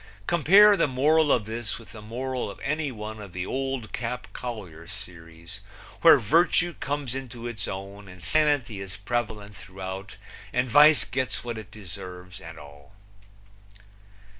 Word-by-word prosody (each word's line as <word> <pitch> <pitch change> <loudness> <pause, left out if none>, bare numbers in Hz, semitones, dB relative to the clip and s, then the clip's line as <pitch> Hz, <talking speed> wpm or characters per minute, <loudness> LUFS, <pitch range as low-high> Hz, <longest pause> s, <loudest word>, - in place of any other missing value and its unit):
Compare 195 - +7
the 190 - +2
moral 145 +3 +3
of 115 - +2
this 110 0 -4
with 115 - -13
the 110 - -10
moral 125 +3 -3
of 100 - -9
any 150 0 -1
one 110 -1 -7
of 100 -4 -10
the 90 +1 -3
Old 135 -4 -3
Cap 125 +1 -4
Collier 95 -10 -7
series, 85 0 -10 0.4
where - - +9
virtue 170 - +3
comes 140 -4 -3
into 125 -3 -7
its 120 -4 -4
own 100 +1 -7
and 90 -1 -12
sanity 145 -9 +1
is 95 0 -7
prevalent 105 -1 -3
throughout 95 +1 -7 0.4
and 125 +1 +1
vice 150 +4 +7
gets 130 0 -2
what 120 -2 -4
it 105 -3 -11
deserves, 90 -2 -9
and 80 0 -10
all. 70 +3 -14
110 Hz, 150 wpm, -26 LUFS, 95-135 Hz, 0.4 s, where